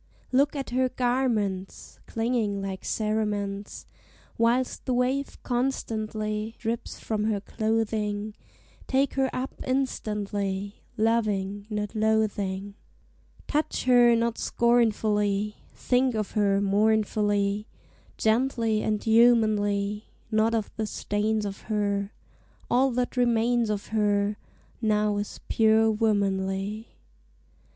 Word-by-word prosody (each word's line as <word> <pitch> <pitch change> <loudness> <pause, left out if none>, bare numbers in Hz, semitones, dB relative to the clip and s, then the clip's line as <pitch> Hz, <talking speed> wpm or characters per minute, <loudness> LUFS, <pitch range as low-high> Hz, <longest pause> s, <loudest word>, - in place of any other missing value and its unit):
Look 280 +3 +3
at 275 -3 -4
her 255 +1 +2
garments 235 -7 -1
Clinging 225 -3 -1
like 195 -1 -5
cerements, 210 -2 -2 0.5
Whilst 240 +2 +1
the 255 - +1
wave 260 +3 0
constantly 220 -4 -2
Drips 230 0 -4
from 215 -1 -2
her 215 -2 0
clothing; 215 -1 -1 0.5
Take 270 +1 +1
her 265 -1 +1
up 260 +1 -4
instantly, 205 -6 -2 0.2
Loving, 205 -3 0
not 210 -1 -3
loathing! 205 -3 0 0.7
Touch 305 +1 -1
her 245 -2 +6
not 230 0 0
scornfully! 210 -3 +1 0.2
Think 250 -1 +1
of 215 -2 -2
her 200 -2 +2
mournfully, 205 0 +1 0.5
Gently 225 -1 +1
and 215 -1 -1
humanly, 215 -3 +3 0.3
Not 220 +1 +2
of 220 -3 -2
the 220 -1 -1
stains 210 +1 -1
of 195 -1 -5
her; 200 -1 0 0.6
All 260 +2 +4
that 250 +1 -2
remains 240 -1 +2
of 205 -1 -3
her 205 -1 +1 0.4
Now 210 -2 +2
is 205 0 -4
pure 220 0 +4
womanly. 200 -1 0
215 Hz, 105 wpm, -26 LUFS, 205-235 Hz, 0.7 s, her